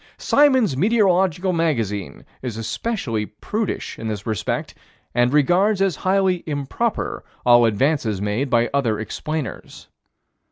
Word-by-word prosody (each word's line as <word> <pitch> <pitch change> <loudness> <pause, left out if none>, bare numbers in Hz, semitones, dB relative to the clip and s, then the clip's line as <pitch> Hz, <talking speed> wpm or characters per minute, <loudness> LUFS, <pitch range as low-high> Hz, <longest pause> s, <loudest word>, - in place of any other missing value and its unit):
Symons' 260 - +3
Meteorological 190 - +2
Magazine 115 - -2 0.2
is 120 -4 -5
especially 115 - -3
prudish 210 - -4
in 115 - -5
this 105 -2 -4
respect 110 -4 -2 0.4
and 120 +1 +2
regards 180 +8 +3
as 195 -6 +1
highly 190 -2 +1
improper 150 - -2 0.2
all 120 -1 +6
advances 115 -2 +1
made 105 +7 -1
by 120 -1 +2
other 120 -7 +1
explainers. 155 +6 -5
145 Hz, 115 wpm, -21 LUFS, 115-190 Hz, 0.4 s, all